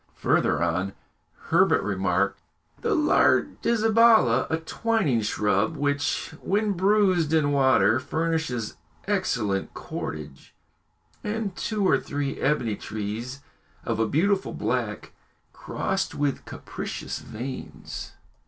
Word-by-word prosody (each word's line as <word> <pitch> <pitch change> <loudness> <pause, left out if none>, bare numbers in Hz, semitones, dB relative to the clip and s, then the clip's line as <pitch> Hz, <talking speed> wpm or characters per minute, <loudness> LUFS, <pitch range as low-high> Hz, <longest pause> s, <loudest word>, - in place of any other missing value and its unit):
Further - - +2
on, 90 +3 -1 0.6
Herbert 190 +4 +4
remarked - - 0 0.4
the 450 -3 +1
lardizabala, 225 - +4
a 160 - +1
twining 165 - 0
shrub 105 +7 0
which, 145 +1 -1
when 210 +2 +1
bruised 190 -4 +2
in 150 -3 +3
water, 130 -5 +4
furnishes 160 -5 -2 0.3
excellent 120 - -1
cordage; 75 -3 -7 0.7
and 210 -2 -3
two 210 -3 -1
or - - +4
three 140 -1 -3
ebony 130 -7 +1
trees 110 +7 -5 0.4
of - - -1
a 115 - +2
beautiful 195 - +1
black, - - -2 0.4
crossed 190 0 -2
with 145 -1 -1
capricious - - -6
veins. 125 +4 -7
145 Hz, 100 wpm, -25 LUFS, -, 0.7 s, Herbert